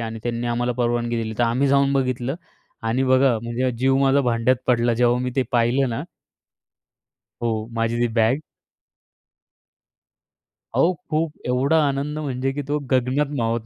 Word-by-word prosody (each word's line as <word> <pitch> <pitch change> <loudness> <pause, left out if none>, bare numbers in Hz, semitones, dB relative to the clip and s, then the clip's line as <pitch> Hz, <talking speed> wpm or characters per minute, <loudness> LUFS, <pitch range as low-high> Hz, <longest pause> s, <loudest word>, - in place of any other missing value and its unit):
आणि 115 -1 -5
त्यांनी 120 0 -2
आम्हाला 120 +1 0
परवानगी 120 -1 -1
दिली, 110 0 -5
तर 120 - +3
आम्ही 125 +4 +1
जाऊन 140 0 +3
बघितलं 130 -1 -1 0.5
आणि 115 +3 0
बघा 130 -2 +3
म्हणजे, 120 +2 -1
जीव 135 +1 +3
माझा 135 +1 +3
भांड्यात 120 0 +2
पडला, 120 -1 +2
जेव्हा 120 +1 +2
मी 125 - -2
ते 130 - +3
पाहिलं 125 +3 +2
ना 120 +4 -3 1.4
हो, 110 -2 -1
माझी 115 +1 0
ती 120 - +2
बॅग. 115 +5 +2 2.3
अहो, 180 - +3 0.2
खूप 155 0 0 0.2
एवढा 130 +6 +2
आनंद 140 +2 -2
म्हणजे 135 -3 -2
की 145 - -3
तो 145 - 0
गगनात 130 +3 +2
मावत 115 -1 -1
125 Hz, 150 wpm, -22 LUFS, 115-135 Hz, 2.3 s, तर